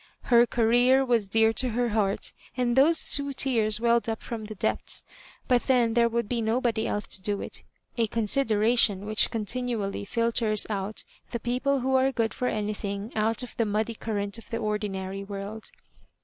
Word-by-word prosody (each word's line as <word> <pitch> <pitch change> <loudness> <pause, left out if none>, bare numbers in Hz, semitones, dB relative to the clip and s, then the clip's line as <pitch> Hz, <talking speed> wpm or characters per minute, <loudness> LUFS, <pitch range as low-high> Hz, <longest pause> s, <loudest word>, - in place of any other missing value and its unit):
Her 240 0 +7
Career 245 +4 +3
was 235 -5 +1
dear 225 +2 +3
to 255 +2 0
her 240 +1 0
heart, 205 -2 0 0.2
and 240 -1 +1
those 305 +5 +4
two 280 -1 0
tears 225 -6 +2
welled 235 0 +2
up 225 - -4
fh>m 220 -3 -6
the 215 - -8
depths; - - -2 0.4
but 250 -2 +3
then 245 -4 +3
there 235 0 +3
would 235 -1 -1
be 235 0 -1
nobody 225 0 0
else 205 - -2
to 190 - -6
do 205 +1 -2
it— - - -7 0.4
a 230 - +3
consideration 220 -2 +2
which 215 +1 +3
oontinually 220 -3 -3
filters 230 -2 +1
out 200 +1 -3 0.3
the 235 - -4
people 255 +3 0
who 265 +1 0
are 265 +1 +2
good 230 -4 -1
for 250 - -2
anything 210 0 -3
out 220 +3 0
of 250 - -9
the 230 - +2
muddy 215 +2 -1
current 205 -1 -3
of - - -16
the 230 - -2
ordinary 200 -3 -3
world. 200 +2 -7
225 Hz, 175 wpm, -27 LUFS, 210-245 Hz, 0.4 s, Her